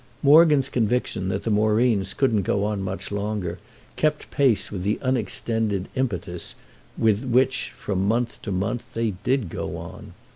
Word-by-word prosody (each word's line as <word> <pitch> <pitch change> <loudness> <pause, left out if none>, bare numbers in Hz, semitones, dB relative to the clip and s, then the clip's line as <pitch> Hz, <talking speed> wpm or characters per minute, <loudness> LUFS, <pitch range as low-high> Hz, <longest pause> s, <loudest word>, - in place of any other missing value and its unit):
Morgan's 150 -2 +6
conviction 115 -6 0
that 95 +1 -2
the 115 - -1
Moreens 105 -2 +2
couldn't 115 -7 +2
go 100 +1 0
on 105 -1 -1
much 95 +1 -4
longer 100 -3 -3 0.4
kept 155 -1 0
pace 125 -9 +2
with 95 -3 -4
the 105 +4 0
unexpended 110 -5 0
impetus 90 -9 -3 0.4
with 110 +1 +2
which, 130 +1 +1
from 95 -1 -1
month 115 +2 0
to 105 - -5
month, 100 +6 -3
they 115 -1 0
did 120 +4 -1
go - - -5
on. - - -10
110 Hz, 150 wpm, -24 LUFS, 100-125 Hz, 0.4 s, Morgan's